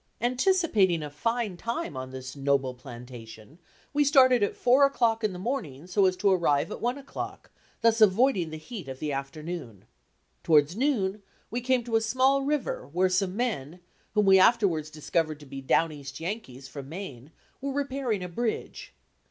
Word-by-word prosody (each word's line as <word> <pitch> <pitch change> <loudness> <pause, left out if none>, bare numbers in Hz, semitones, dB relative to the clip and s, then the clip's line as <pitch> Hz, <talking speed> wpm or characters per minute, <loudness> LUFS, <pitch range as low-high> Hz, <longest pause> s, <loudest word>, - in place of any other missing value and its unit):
Anticipating 245 - +2
a 150 - -6
fine 230 +4 -2
time 235 - -4
on 130 0 -5
this 130 0 -8
noble 135 -2 +1
"plantation," 120 +1 -11 0.3
we 290 0 +3
started 260 -4 +5
at 205 - 0
four 255 +3 +4
o'clock 235 -5 +2
in 215 - +1
the 180 - -7
morning 180 - -4
so 190 +2 +3
as 185 0 0
to 200 +1 +3
arrive 165 -6 +2
at - - -6
one 245 +3 0
o'clock, 280 -1 -7 0.3
thus 230 0 +3
avoiding 205 -3 +4
the 155 - -6
heat 185 - -8
of 130 -1 -6
the 150 +2 -3
afternoon. 140 - -6 0.6
Towards 150 +1 +4
noon 215 -6 0 0.3
we 240 +2 -2
came 255 0 +1
to 225 -1 +1
a - - 0
small 260 +5 +2
river 290 0 -2
where 185 +3 +2
some 185 0 0
men, 180 - -2 0.4
whom 210 -1 +3
we 190 -1 +7
afterwards 185 -8 +3
discovered 155 0 -2
to 150 - -13
be 135 0 -8
down 160 +4 +2
east 140 -2 -9
Yankees, 165 - -6
from 140 -1 -9
Maine, 155 -6 -8 0.3
were 275 0 -2
repairing 265 -7 -2
a - - -4
bridge. 220 +6 -4
185 Hz, 175 wpm, -27 LUFS, 145-240 Hz, 0.6 s, we